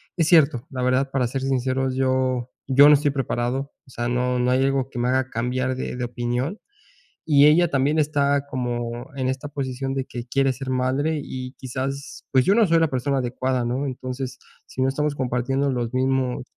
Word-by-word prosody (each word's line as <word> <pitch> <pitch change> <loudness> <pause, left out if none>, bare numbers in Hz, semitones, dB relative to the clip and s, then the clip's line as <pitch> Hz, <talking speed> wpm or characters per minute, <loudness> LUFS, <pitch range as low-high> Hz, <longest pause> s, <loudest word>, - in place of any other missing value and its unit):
es 165 -3 +1
cierto, 150 -7 +4
la 130 -2 -4
verdad, 130 +2 +2
para 135 -2 +1
ser 130 +3 -3
sinceros, 130 0 0
yo 130 -1 0 0.2
yo 140 +2 +8
no 150 - +8
estoy 145 0 +1
preparado, 135 0 -2 0.2
o - - -18
sea, 120 -1 -3
no 125 0 0
no 125 +1 +2
hay 130 +1 +3
algo 135 -1 0
que 130 - -6
me 120 - +1
haga 130 0 +1
cambiar 130 +2 -1
de 130 - -4
de 125 - -4
opinión. 120 - -2 0.7
Y 145 -2 +6
ella 170 +3 +5
también 140 +3 +1
está 145 -2 +1
como 120 -2 -4
en 130 -2 -1
esta 130 +2 -3
posición 135 -2 -4
de 135 - -1
que 120 -1 -7
quiere 135 +1 +2
ser 130 +1 -7
madre 135 +5 0
y 130 -1 -6
quizás, 135 +2 -5
pues, 130 -2 +4
yo 200 - +4
no 230 - +5
soy 165 0 +4
la 160 - +2
persona 135 +1 0
adecuada, 130 0 -1
¿no? 125 +4 -1
Entonces, 130 0 -5 0.3
si 130 - -6
no 130 - +3
estamos 150 +2 -1
compartiendo 135 +2 0
los 120 -2 -2
mismos 130 -1 0
130 Hz, 200 wpm, -23 LUFS, 125-140 Hz, 0.7 s, yo